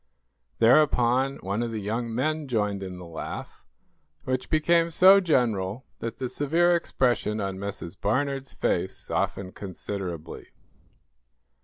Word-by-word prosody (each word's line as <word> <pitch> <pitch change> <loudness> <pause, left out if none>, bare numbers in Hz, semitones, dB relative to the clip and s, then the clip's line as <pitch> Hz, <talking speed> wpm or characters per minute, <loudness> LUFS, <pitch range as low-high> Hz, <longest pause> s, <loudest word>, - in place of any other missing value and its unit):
Thereupon, 130 +1 +4
one 100 +4 -1
of 120 - -1
the 110 -1 -4
young 115 +3 -3
men 150 +5 -1
joined 105 -5 -1
in 95 -1 -6
the 90 - -9
laugh, 85 -1 -7 0.6
which 130 0 -2
became 165 +2 +3
so 190 +4 +7
general 120 - 0
that 115 - -5
the 130 - -3
severe 165 +7 +2
expression 120 -9 0
on 95 -2 -3
Mrs. 100 -3 -6
Barnard's 135 +6 -1
face - - -1
softened 95 -1 -2
considerably. 95 -4 -6
120 Hz, 125 wpm, -26 LUFS, 100-140 Hz, 0.6 s, so